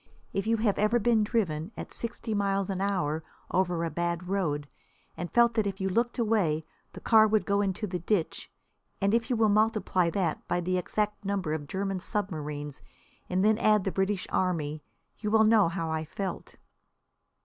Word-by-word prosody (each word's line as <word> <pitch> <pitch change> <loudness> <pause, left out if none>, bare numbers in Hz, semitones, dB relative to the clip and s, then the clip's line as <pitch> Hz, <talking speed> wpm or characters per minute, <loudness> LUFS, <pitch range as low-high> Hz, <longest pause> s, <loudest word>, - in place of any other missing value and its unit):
If 195 +2 -1
you 230 0 +3
have 215 -2 +1
ever 215 +3 +3
been 225 -1 +3
driven 185 -6 -1
at - - -7
sixty 230 -1 -3
miles 200 -1 0
an 190 0 -3
hour 160 -6 0 0.3
over 175 -2 +1
a 165 - -3
bad 170 +2 -2
road, 155 -7 -1 0.5
and 175 0 -5
felt 235 0 +4
that 220 -3 +1
if 195 -1 -4
you 190 0 0
looked 235 +6 0
away 200 -10 +1 0.3
the - - -8
car 220 -1 +5
would 215 0 +2
go 200 0 +2
into 195 +1 -1
the 180 -3 -3
ditch, 175 0 -1 0.5
and 200 +1 +2
if 230 0 +1
you 250 - +2
will 225 -1 +3
multiply 210 -4 +2
that 175 -3 -2
by 175 - 0
the 180 +1 0
exact 210 +3 -2
number 195 -5 -1
of 145 -2 -4
German 195 +1 -2
submarines 150 - -4 0.5
and 185 +2 +1
then 215 +1 +4
add 215 -3 +4
the 195 - -1
British 190 0 0
Army, 155 -5 0 0.4
you 210 - -2
will 220 +1 +5
know 215 -5 +5
how 165 -1 -3
I 160 0 -1
felt. 190 +5 -5
195 Hz, 185 wpm, -28 LUFS, 170-215 Hz, 0.5 s, car